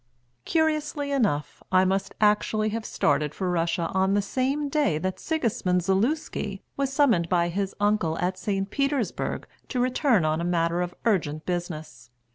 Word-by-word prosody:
Curiously 305 -2 0
enough, 210 - 0
I 185 0 +5
must 195 +1 -1
actually 215 +1 +2
have 220 +1 -4
started 150 +1 +1
for 185 -2 -1
Russia 170 0 0
on 190 +1 +2
the 205 - +3
same 270 +7 -1
day 285 - +1
that 185 +4 -3
Sigismund 230 - 0
Zaluski 200 - -1
was 275 -1 -1
summoned 245 - +3
by 175 -1 +2
his 195 +2 -2
uncle 205 -6 +1
at 180 +2 0
St. 195 +1 -2
Petersburg 275 -5 -1 0.2
to 255 - -2
return 250 - +2
on 155 +1 +1
a - - -2
matter 170 0 +1
of 180 0 -3
urgent 160 -8 0
business. 155 -9 -5
195 Hz, 155 wpm, -26 LUFS, 170-250 Hz, 0.2 s, I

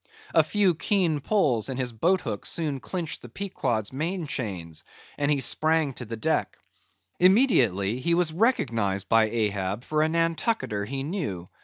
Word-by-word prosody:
A - - +6
few 200 -4 +2
keen 165 -2 +1
pulls, 140 - +1
and 130 - -4
his 125 -2 -2
boat 175 - +2
hook - - -4
soon 150 -5 -1
clinched 170 +3 -4
the 120 - -11
Pequod's 120 - -3
main 165 +5 -2
chains, 95 - -4 0.3
and 145 0 -1
he 145 -2 +2
sprang 155 +2 +2
to 125 - -8
the 115 +1 -6
deck. 110 - -1 0.6
Immediately 130 - +3
he 170 +6 +1
was 170 -2 +1
recognised 115 - +1
by 115 -1 +4
Ahab 105 -1 -1
for 155 +3 0
a 155 - +2
Nantucketer 165 - 0
he 135 +4 -4
knew. 140 - -4
140 Hz, 160 wpm, -26 LUFS, 110-170 Hz, 0.6 s, A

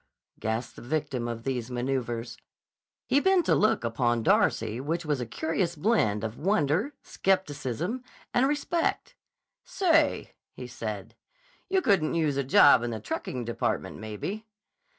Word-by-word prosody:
gasped 110 +3 -3
the - - -9
victim 135 -2 -2
of 115 -1 -5
these 125 -2 -2
maneuvers. 120 -2 -2 0.7
He 280 - +3
bent 380 +2 +3
a - - +4
look 215 - +2
upon 120 0 0
Darcy 115 +1 +2
which 165 +4 -2
was 145 -4 0
a 120 - -4
curious 165 - -1
blend 150 - +1
of 110 +1 -4
wonder, 185 - +1
skepticism, 180 - -1 0.3
and 255 +2 +4
respect. 295 +3 -1 0.5
"Say," 330 -6 +2 0.2
he - - -8
said, - - -6 0.5
"you 380 -1 +2
couldn't 180 -7 +2
use 155 -4 +1
a 140 - 0
job 135 -1 +6
in 120 - -2
the 110 -2 -4
trucking 120 +3 -4
department, 120 - -2
maybe?" 110 - -5
145 Hz, 140 wpm, -28 LUFS, -, 0.7 s, job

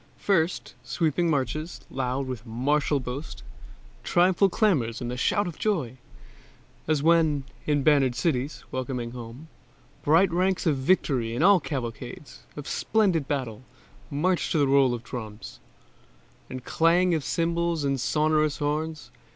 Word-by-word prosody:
First, 180 -3 0
sweeping 160 +6 0
marches, 155 +3 -2
loud 130 +1 -2
with 130 -4 -6
martial 140 +5 0
boast, 130 +4 -7 0.6
Triumphal 185 +2 +3
clamors 150 - +1
and 120 -1 -4
the - - -3
shout 205 +10 +1
of 175 - -7
joy, 150 - -1 0.9
As 150 -2 +1
when, 160 -4 +3 0.2
in 145 -2 +1
bannered 140 -5 +3
cities, 135 +1 -1
welcoming 125 -2 -3
home, 120 +5 -9 0.6
Bright 165 +5 +4
ranks 185 +1 +1
of 155 -4 +2
victory 130 -6 +1
and 180 +4 +5
cavalcades 125 +1 -6 0.2
Of 145 -1 -7
splendid 185 -10 +1
battle 130 -6 -3 0.5
march 175 +5 0
to 150 -4 +3
roll 135 -2 +4
of 120 - -9
drums 110 -4 -8 0.9
And 130 -1 -7
clang 175 +2 +3
of 155 -3 0
cymbals 170 +1 0
and 135 -2 0
sonorous 155 +1 +1
horns. 155 +1 -3
145 Hz, 130 wpm, -26 LUFS, 130-165 Hz, 0.9 s, and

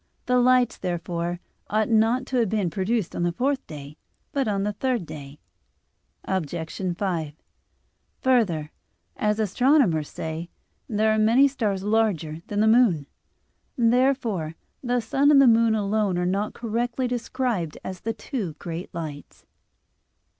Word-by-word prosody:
The 250 0 +3
lights, 250 -1 +3
therefore, 175 -1 -3 0.3
ought 215 +1 +1
not 230 +3 +2
to 265 - -2
have 230 -4 +2
been 200 -5 0
produced 195 +2 -1
on - - -2
the 175 0 +1
fourth 265 +8 -1
day, 145 -1 -9 0.3
but 275 -4 0
on 200 -2 0
the 210 +1 -1
third 245 -3 -1
day. 150 -2 -10 0.9
Obj. 175 -5 -2 0.4
5: 170 -7 -2 0.9
Further, 195 -13 +2 0.4
as 210 0 0
astronomers 215 - +2
say, 160 +2 -5 0.4
there 215 -1 +2
are 215 - +2
many 235 +6 +5
stars 210 -8 -2
larger 195 -8 0
than 205 0 -1
the 220 - +4
moon. 220 - +4 0.7
Therefore 235 - +1 0.3
the 245 -1 0
sun 270 +6 +2
and 290 -2 +7
the 275 - +7
moon 230 -2 +5
alone 205 -2 0
are 180 - 0
not 200 +4 -1
correctly 240 +2 -2
described 240 -8 -2
as 185 -1 -6
the 225 - -3
"two 220 - -4
great 165 +3 -7
lights." 150 -4 -7
210 Hz, 140 wpm, -25 LUFS, 175-245 Hz, 0.9 s, and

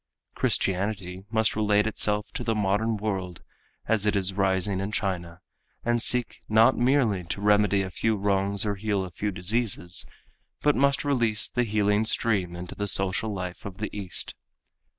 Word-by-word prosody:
Christianity 95 -1 0
must 110 -1 +1
relate 105 -1 +2
itself 105 -1 -1
to - - -4
the 115 - 0
modern 105 +2 0
world 95 -4 -4 0.4
as 105 -2 +1
it 105 - +2
is 95 -1 +1
rising 95 0 0
in 100 +2 -3
China 90 -4 -3 0.4
and 120 0 +1
seek 125 0 +3
not 110 +4 +5
merely 120 -7 +2
to 85 - -4
remedy 105 -1 +3
a 95 - -6
few 110 +4 0
wrongs 100 0 0
or 105 - 0
heal 100 -2 -1
a 90 - -9
few 105 +4 -3
diseases, 95 -1 -1 0.6
but 150 -1 +3
must 140 +1 +2
release 120 -6 +2
the 125 0 -1
healing 105 -1 +1
stream 100 -6 +1
into 90 0 -7
the 105 - -4
social 95 +3 +2
life 90 -3 -6
of 95 -2 -8
the 105 -1 -5
East. 95 -4 -4
105 Hz, 165 wpm, -26 LUFS, 95-110 Hz, 0.6 s, not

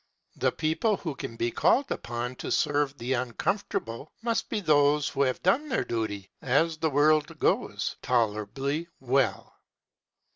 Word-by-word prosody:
The - - +2
people 175 +7 0
who 160 -4 -4
can 115 -3 -7
be 120 +1 -1
called 275 - +2
upon 120 +1 -3
to - - -5
serve 145 -1 +1
the 125 +2 -2
uncomfortable 130 - -2
must 230 -1 0
be 215 - -1
those 150 -4 +3
who 140 - -2
have 130 -2 +1
done 260 +12 +2
their 260 - +1
duty, 105 -4 -3
as 160 +5 +2
the 160 0 +1
world 150 +1 +3
goes, - - 0
tolerably 125 +7 0
well. 135 +1 0
140 Hz, 145 wpm, -28 LUFS, 120-160 Hz, -, those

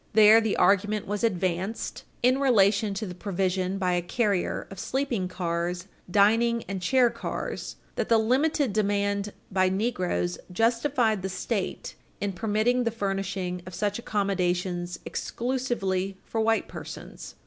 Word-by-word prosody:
There, 215 +1 +8
the 220 -2 0
argument 205 +1 +3
was 205 +2 -3
advanced, 190 0 -1 0.2
in 255 +2 +4
relation 210 -5 +3
to 215 +3 -3
the 180 - -6
provision 185 0 -1
by 185 -2 +1
a 175 - +1
carrier 200 +1 0
of 195 - -8
sleeping 250 -6 -1
cars, 175 -1 -2 0.2
dining, 225 +4 +3
and 190 0 -5
chair 245 +6 +4
cars, - - -5 0.2
that - - -1
the 230 - +6
limited 260 +2 +2
demand 200 -1 0 0.2
by 185 -1 +3
negroes 180 - -1
justified 230 +1 +2
the 190 - -3
State - - -3 0.3
in 200 -1 -2
permitting 220 +5 +1
the 230 - +1
furnishing 195 -4 -2
of 185 - -7
such 205 +3 -1
accommodations 180 -4 -1
exclusively 215 -7 -2
for 225 - -1
white 225 0 +2
persons. - - -9
200 Hz, 135 wpm, -27 LUFS, 185-230 Hz, 0.3 s, There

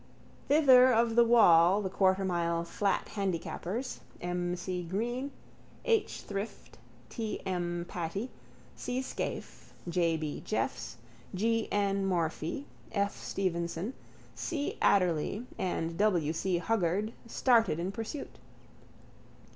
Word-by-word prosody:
Thither 260 -4 +7
of 230 -1 +3
the 235 - +7
wall 190 -6 +6
the 190 - -1
quartermile 180 -3 +1
flat 195 +3 -1
handicappers, 195 +4 -3 0.2
M. 175 0 -2
C. 180 0 -3
Green, 235 +10 -2 0.6
H. 450 -3 +1
Shrift, 200 +2 -6 0.3
T. 225 -3 -4
M. 175 -2 -2
Patey, 180 +8 -4 0.4
C. 255 +1 -3
Scaife, - - -6
J. 170 -1 +1
B. 155 -2 -4
Jeffs, - - -2 0.4
G. 225 +3 0
N. 200 -1 +1
Morphy, 170 - -1 0.3
F. 200 -1 0
Stevenson, 175 +3 -2 0.4
C. 295 -4 -3
Adderly 185 +3 +2
and 165 -2 -2
W. 175 -7 +2
C. 180 +2 0
Huggard, 205 +2 0
started 230 - +3
in 175 +3 -2
pursuit. 225 +7 -6
195 Hz, 105 wpm, -31 LUFS, 175-225 Hz, 0.6 s, Thither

